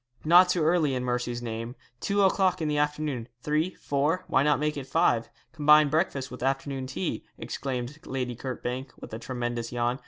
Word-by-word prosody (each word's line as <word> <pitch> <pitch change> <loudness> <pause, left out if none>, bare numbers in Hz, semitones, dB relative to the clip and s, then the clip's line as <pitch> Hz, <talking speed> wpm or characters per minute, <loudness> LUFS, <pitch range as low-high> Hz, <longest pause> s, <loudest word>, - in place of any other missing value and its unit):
'Not 175 +3 +7
too 180 -3 +2
early, 155 -4 +2
in 125 - -2
mercy's 120 -1 -2
name. 115 +1 -5 0.2
Two 200 +6 +1
o'clock 190 -1 +3
in 160 - -1
the 150 -1 +1
afternoon, 150 -5 -1 0.2
three, 155 +4 0
four; 150 +6 0
why - - +3
not 150 +1 +3
make 150 0 0
it 140 -2 -6
five 115 -3 +2 0.2
combine 150 -1 +6
breakfast 140 -4 0
with 125 - -8
afternoon 135 0 -1
tea,' 95 -7 -3
exclaimed 130 +2 -4
Lady 125 -2 -3
Kirkbank, 130 +1 -5
with - - -10
a 110 - -4
tremendous 120 -1 -3
yawn. 120 +1 0
135 Hz, 180 wpm, -27 LUFS, 125-155 Hz, 0.2 s, Not